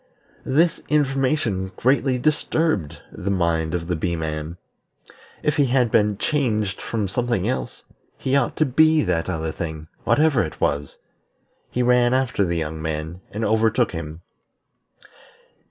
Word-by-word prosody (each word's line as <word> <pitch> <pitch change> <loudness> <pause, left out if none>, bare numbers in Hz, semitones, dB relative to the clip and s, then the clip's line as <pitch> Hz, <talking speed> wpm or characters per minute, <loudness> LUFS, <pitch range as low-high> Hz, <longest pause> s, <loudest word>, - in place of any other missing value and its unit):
This 160 +6 +2
information 135 -9 +1
greatly 130 0 +2
disturbed 150 - 0
the 100 - -5
mind 85 -3 0
of 85 -1 -3
the 90 +1 -1
Bee 85 +2 -1
man. 80 +1 -4 0.9
If 150 - +1
he 145 -2 +4
had 125 -2 +2
been 105 -1 +3
changed 110 -8 0
from 110 -3 -2
something 120 -1 -1
else, 130 - -3 0.3
he 135 +1 0
ought 140 -3 +1
to 155 - +2
be 155 +3 +4
that 80 +2 -1
other 80 -3 -2
thing, 80 -1 -6
whatever 150 -5 +3
it 80 - -5
was. 70 0 -1 0.7
He 125 - 0
ran 125 0 +4
after 130 -6 +1
the 85 -2 -1
young 80 -1 -3
man, 80 +2 -4
and 110 +2 -3
overtook 110 +2 +2
him. 80 -1 -6
105 Hz, 140 wpm, -22 LUFS, 85-130 Hz, 0.9 s, he